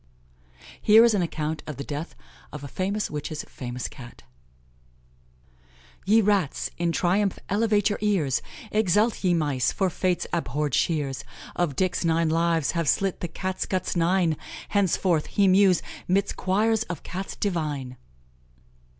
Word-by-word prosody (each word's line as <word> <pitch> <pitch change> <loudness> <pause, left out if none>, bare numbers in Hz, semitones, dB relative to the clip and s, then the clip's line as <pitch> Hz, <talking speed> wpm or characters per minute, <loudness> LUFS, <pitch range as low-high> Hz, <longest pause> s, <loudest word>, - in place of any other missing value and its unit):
Here 220 +2 +7
is 235 - +4
an 200 - +2
account 160 -2 -2
of 150 -4 -6
the 140 - -4
death 150 +4 -6 0.4
of 150 -1 -8
a - - -5
famous 195 +7 -2
witch's 150 +1 -4
famous 125 -1 -6
Cat: 120 - -12 1.8
"Ye 220 +3 +6
rats, 200 -8 +1
in 170 -1 +1
triumph 190 +4 +1
elevate 210 0 +2
your - - -3
ears! 180 -11 +1 0.3
Exult, 210 +2 +2
ye 180 -2 +3
mice! 145 -6 +1
for 190 -2 0
Fate's 180 0 0
abhorred 150 -3 -1
shears 140 -3 0 0.3
Of 165 -6 0
Dick's 185 +3 0
nine 165 -1 +2
lives 165 -2 +1
have 165 -4 0
slit 195 -2 +1
the 175 - -3
Cat 185 +3 -3
guts 185 -1 -1
nine; 170 -2 +2 0.3
Henceforth 185 -5 +1
he 200 -1 +2
mews 185 -1 +5 0.2
'midst 195 +2 +1
choirs 215 +4 +1
of 175 -4 -5
Cats 190 +2 -5
divine!" 150 -9 -2
175 Hz, 140 wpm, -25 LUFS, 150-195 Hz, 1.8 s, Here